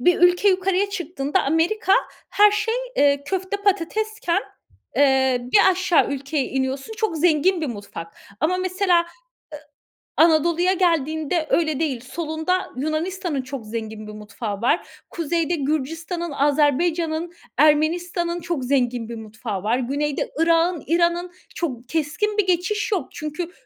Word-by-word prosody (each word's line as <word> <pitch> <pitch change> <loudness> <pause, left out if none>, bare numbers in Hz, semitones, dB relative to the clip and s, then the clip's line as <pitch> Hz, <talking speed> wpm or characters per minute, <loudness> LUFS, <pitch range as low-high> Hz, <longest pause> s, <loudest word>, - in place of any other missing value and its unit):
bir 355 +7 +3
ülke 355 +3 +5
yukarıya 385 +1 +1
çıktığında 345 -3 -1
Amerika 340 +8 +1 0.4
her 415 +1 +6
şey, 425 +2 0 0.2
eee, 280 0 +3
köfte, 380 +3 -2
patatesken, 405 0 0 0.5
eee, 265 -2 +4
bir 405 -2 +6
aşağı 365 -2 +2
ülkeye 280 +1 -2
iniyorsun, 265 +6 -2
çok 440 -7 -1
zengin 335 +2 +3
bir 310 - -1
mutfak. 200 -8 -8 0.2
Ama 325 +6 +2
mesela, 370 -1 +2
ııı, 340 - -5 1.1
Anadolu'ya 340 +3 +4
geldiğinde 315 -2 0
öyle 315 -4 +1
değil. 285 -7 -1
Solunda 320 +6 -2
Yunanistan'ın 310 +2 -2
çok 255 -2 -7
zengin 220 -1 -6
bir 215 - -7
mutfağı 210 0 -6
var. 250 +8 +1 0.2
Kuzeyde 335 +1 -1
Gürcistan'ın, 320 +4 -3
Azerbaycan'ın, 315 +4 +1 0.2
Ermenistan'ın 340 +4 +2
çok 330 -6 -3
zengin 245 -3 0
bir 235 - -5
mutfağı 215 -2 -6
var. 225 +4 +1
Güneyde 285 +3 -2
Irak'ın, 335 0 +2
İran'ın. 345 +2 +1 0.2
Çok 250 -8 -4
keskin 325 +7 -1
bir 400 -3 +2
geçiş 370 +5 0
yok. 390 -5 0
Çünkü 305 +3 -5
320 Hz, 130 wpm, -22 LUFS, 275-360 Hz, 1.1 s, her